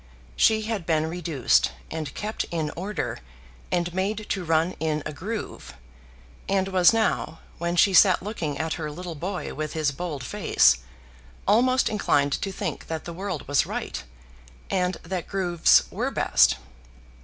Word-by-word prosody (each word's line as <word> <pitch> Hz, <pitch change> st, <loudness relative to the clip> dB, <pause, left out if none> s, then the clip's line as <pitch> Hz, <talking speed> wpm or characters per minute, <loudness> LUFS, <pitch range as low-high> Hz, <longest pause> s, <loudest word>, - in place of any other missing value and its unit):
She 220 Hz, -, +4 dB
had 215 Hz, -6 st, -3 dB
been 160 Hz, -2 st, +2 dB
reduced, 160 Hz, -, +1 dB, 0.2 s
and 155 Hz, -4 st, -4 dB
kept 215 Hz, +1 st, -3 dB
in 160 Hz, -3 st, -3 dB
order, 195 Hz, +5 st, -3 dB, 0.5 s
and 175 Hz, -1 st, 0 dB
made 200 Hz, +3 st, -1 dB
to 190 Hz, -, -1 dB
run 165 Hz, +1 st, +2 dB
in 155 Hz, -1 st, -1 dB
a 155 Hz, -, -4 dB
groove, 185 Hz, -, -6 dB, 0.7 s
and 195 Hz, -1 st, +1 dB
was 185 Hz, -2 st, +6 dB
now, 220 Hz, -7 st, 0 dB, 0.2 s
when 170 Hz, +1 st, -1 dB
she 195 Hz, +2 st, +5 dB
sat 185 Hz, -1 st, +6 dB
looking 170 Hz, -9 st, -3 dB
at 160 Hz, 0 st, -1 dB
her 155 Hz, -, -3 dB
little 175 Hz, +3 st, -6 dB
boy 180 Hz, +5 st, -4 dB
with 155 Hz, -1 st, -4 dB
his 155 Hz, -3 st, +1 dB
bold 150 Hz, -2 st, -5 dB
face, -, -, +3 dB, 0.7 s
almost 255 Hz, +4 st, +4 dB
inclined 145 Hz, -9 st, +1 dB
to 195 Hz, -, -2 dB
think 190 Hz, -5 st, -5 dB
that 160 Hz, -1 st, -4 dB
the 170 Hz, -, -6 dB
world 185 Hz, -3 st, -5 dB
was 145 Hz, 0 st, +2 dB
right, -, -, -4 dB, 0.7 s
and 180 Hz, -1 st, +1 dB
that 180 Hz, +1 st, -4 dB
grooves 180 Hz, -4 st, +4 dB
were -, -, -1 dB
best. -, -, +4 dB
175 Hz, 155 wpm, -25 LUFS, 155-195 Hz, 0.7 s, was